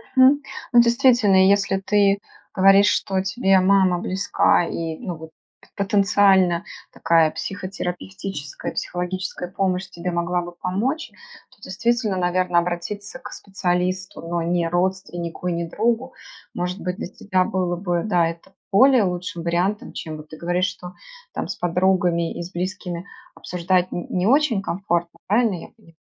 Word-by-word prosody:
Мгм. 265 +2 +6 0.3
Ну, 240 - +8
действительно, 235 -6 +4
если 195 -1 +3
ты 200 0 +2 0.3
говоришь, 195 +1 +6
что 190 -2 +1
тебе 195 0 +2
мама 185 -1 +3
близка, 185 -1 +2
и 165 -1 -4
ну, 185 -8 -5
вот, 160 0 -11 0.5
потенциально 195 -3 +3 0.3
такая 165 -2 +3
психотерапевтическая, 185 -4 -5
психологическая 180 0 -4
помощь 185 -1 -1
тебе 180 0 -4
могла 175 +1 0
бы 175 0 -7
помочь, 205 - -2 0.4
то 205 - -24
действительно, 225 +2 -1
наверно, 180 -1 +2
обратиться 180 +7 -4
к - - -10
специалисту, 185 -1 -2
но 170 +1 -2
не 170 0 0
родственнику 175 -1 -2
и 180 - 0
не 170 0 -3
другу. 235 +7 -1 0.4
Может 180 +2 -3
быть, 180 +1 -3
для - - -5
тебя 185 0 0
было 180 -1 -1
бы, 175 -1 -1
да, 175 -5 +2
это 165 +3 -8 0.2
более 255 +3 +6
лучшим 180 -1 -3
вариантом, 180 +5 -1
чем 155 -2 -6
вот 150 0 -12
ты 155 - -10
говоришь, 175 +2 0
что 185 0 -8 0.4
там - - -3
с - - -4
подругами, 175 -1 +1
и 175 - -4
с 175 - -9
близкими 180 -1 -4 0.3
обсуждать 180 +1 -1
н 175 - -5
не 180 +1 0
очень 260 -5 +3
комфортно, 170 -3 -2
правильно 215 -1 +2
я 165 - -8
поняла? 165 -8 -22
185 Hz, 145 wpm, -22 LUFS, 175-200 Hz, 0.5 s, Ну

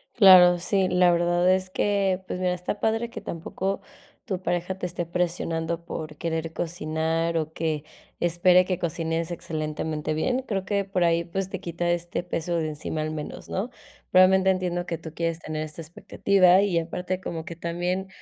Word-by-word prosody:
Claro. 180 -5 +8
Sí, 190 +2 +1
la 180 0 +4
verdad 175 +1 +2
es 185 0 -1
que, 195 -1 +1
pues, 180 - -4
mira, 180 -1 +1
está 180 +3 -4
padre 225 +2 0
que 240 - -8
tampoco 190 +4 -3 0.4
tu 190 -6 -3
pareja 175 +1 -2
te 185 - -4
esté 175 -1 -3
presionando 170 -1 -2
por 155 -3 -6
querer 165 0 -3
cocinar, 165 0 -1
o 155 -1 -2
que 155 -3 -2 0.4
espere 175 +1 +4
que 185 -1 -1
cocines 165 0 -2
excelentemente 155 -2 -3
bien, 250 +12 0
creo 195 -3 -2
que 200 0 0
por 185 -2 0
ahí, 170 0 +3
pues, 190 +2 -3
te 190 - -5
quita 175 -1 -2
este 175 0 -1
peso 175 -1 -2
de 160 -1 -1
encima 155 +1 -4
al 155 0 -2
menos, 150 -1 -7
¿no? 200 +6 -2 0.4
Realmente 190 +1 +6
entiendo 180 -1 -1
que 170 -2 -3
tú 160 -1 -9
quieres 165 -1 -1
tener 155 -2 -4
esta 155 +1 -7
expectativa 185 +3 +3
y 200 -4 +1
aparte, 180 +3 -4
como 165 -3 -5
que 170 - -7
también, 175 +3 -2
175 Hz, 180 wpm, -25 LUFS, 165-185 Hz, 0.4 s, Claro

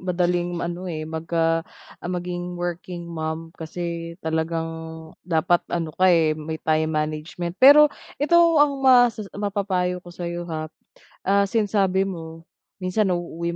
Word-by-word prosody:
madaling 175 -1 0
ano 175 +2 -5
eh, 155 -2 -4
magka 165 +1 0 0.4
ah, - - -6
maging 180 0 -4
working 175 0 -5
mom 165 -1 -5
kasi 170 +1 -5
talagang, 160 0 -3
dapat 175 0 +2
ano 165 -2 -2
ka, 185 +3 +3
eh, 165 -3 +4
may 155 +1 -5
time 155 0 0
management. 155 +3 -3
Pero 290 +2 +8 0.2
ito 340 +4 +4 0.2
ang 285 -2 +3
mas 245 -4 +5 0.2
mapapayo 190 -3 -1
ko 175 - -14
sa'yo 175 0 -5
ha, 155 -1 -5 0.5
ah, 200 +1 +3
since 210 -1 0
sabi 195 -2 +2
mo, 165 -4 -7 0.4
minsan 195 +3 +1
nauuwi 170 -1 -2
175 Hz, 135 wpm, -23 LUFS, 160-185 Hz, 0.5 s, Pero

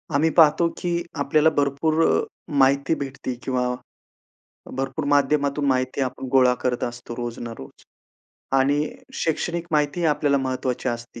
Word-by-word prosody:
आम्ही 160 +3 +3
पाहतो 160 +1 +6
की 175 - -2 0.3
आपल्याला 150 +2 +3
भरपूर 145 +3 +1
अ, - - +3 0.4
माहिती 140 +3 +3
भेटते 135 -2 -5
किंवा 130 -1 0 1.2
भरपूर 135 +3 -2
माध्यमातून 145 0 +2
माहिती 130 0 0
आपण 130 0 -4
गोळा 130 -2 +5
करत 125 -1 0
असतो 120 0 -6
रोज 120 -1 -5
ना 120 -1 -6
रोज. 65 - -12 0.7
आणि 140 +2 +2 0.4
शैक्षणिक 170 +1 -1
माहिती 150 +3 +1
आपल्याला 140 -1 +1
महत्वाची 130 -1 -2
असते. 120 0 -6
140 Hz, 135 wpm, -23 LUFS, 130-150 Hz, 1.2 s, पाहतो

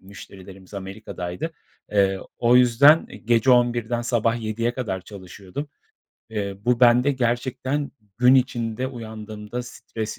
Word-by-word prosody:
müşterilerimiz 95 0 -13
Amerika'daydı. 95 - -6 0.4
Eee, 95 -2 +2 0.2
o 120 +1 +4
yüzden 125 +6 +6 0.2
gece 120 +2 +3
23.00'den 120 -1 +2
sabah 120 -1 0
07.00'e 115 +2 -2
kadar 105 -8 -3
çalışıyordum. 100 +7 -9 0.6
Iıı, 100 -2 -4
bu 125 0 +2
bende 125 +3 +5
gerçekten 130 +3 -1 0.3
gün 125 +1 +6
içinde 125 -2 0
uyandığımda 110 -2 -7
stres 110 -2 -7
115 Hz, 110 wpm, -23 LUFS, 105-125 Hz, 0.6 s, yüzden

